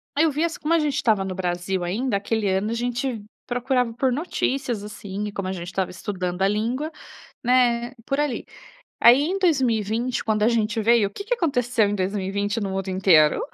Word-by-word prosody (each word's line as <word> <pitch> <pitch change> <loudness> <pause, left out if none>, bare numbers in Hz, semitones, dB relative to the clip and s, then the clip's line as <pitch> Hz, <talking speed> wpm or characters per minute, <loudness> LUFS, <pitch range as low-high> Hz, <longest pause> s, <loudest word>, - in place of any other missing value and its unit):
Aí 300 +3 +4
eu 320 - +2
via 300 +4 0
assim 330 - -4
como 310 +2 0
a - - +3
gente 300 -2 0
estava 215 -8 +2
no 190 - -3
Brasil 180 0 -2
ainda, 205 +5 -1
aquele 215 +1 -1
ano 190 +2 0
a - - 0
gente 245 -1 -2 0.2
procurava 245 0 0
por 260 +2 +1
notícias 270 - -2
assim 205 -1 -6
e - - -5
como 195 -2 -4
a - - -2
gente 175 -2 -5
estava 185 0 -2
estudando 180 -2 -4
a - - +5
língua, 235 +9 -1 0.5
né, 245 -1 +2
por 275 +1 -1
ali. 295 -5 -1 0.5
Aí 245 +4 +7
em 360 +6 -1
2020, 245 - +1
quando 215 -1 0
a - - +5
gente 230 -1 +1
veio, 230 -1 +4
o - - -23
que 400 - -7
que - - +1
aconteceu 250 - +1
em 205 - -1
2020 200 +2 -1
no 200 -3 -3
mundo 195 0 -3
inteiro? 180 -5 +4
225 Hz, 205 wpm, -23 LUFS, 195-255 Hz, 0.5 s, Aí